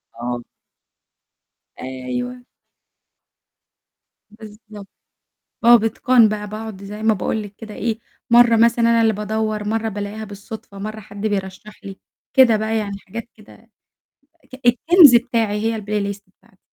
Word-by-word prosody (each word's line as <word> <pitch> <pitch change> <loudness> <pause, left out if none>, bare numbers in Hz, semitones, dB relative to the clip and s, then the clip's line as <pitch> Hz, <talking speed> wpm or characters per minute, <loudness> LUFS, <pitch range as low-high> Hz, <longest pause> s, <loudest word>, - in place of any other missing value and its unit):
آه. 120 0 -4 1.4
أيوه. 130 - -5 1.9
بالضبط. 215 -1 -13 0.8
آه 240 +1 +8
بإتقان 230 +1 +3
بقى 210 0 -4
باقعد 215 -2 -8
زي 210 +2 -8
ما 220 0 +4
باقول 215 +2 -2
لِك 205 -1 -12
كده 220 -2 -10
إيه، 225 0 -3 0.3
مرّة 235 -1 +6
مثلًا 230 +1 +3
أنا 230 0 +3
اللي 225 -1 +3
بادوّر، 215 0 -2
مرّة 225 +1 -1
بالاقيها 205 +1 -6
بالصدفة، 205 0 -10
مرّة 215 +2 -6
حد 205 -1 -11
بيرشح 200 +1 -6
لي، 195 -1 -9 0.4
كده 255 -5 +6
بقى 220 +1 -1
يعني 200 -2 -4
حاجات 230 +5 -9
كده، 220 +1 -19 0.8
ك - - -8
الكنز 295 +4 +6
بتاعي 230 -4 0
هي 225 0 -1
الplay 205 -1 -2
list 200 - -18
بتاع 190 0 -30
215 Hz, 135 wpm, -20 LUFS, 205-230 Hz, 1.9 s, آه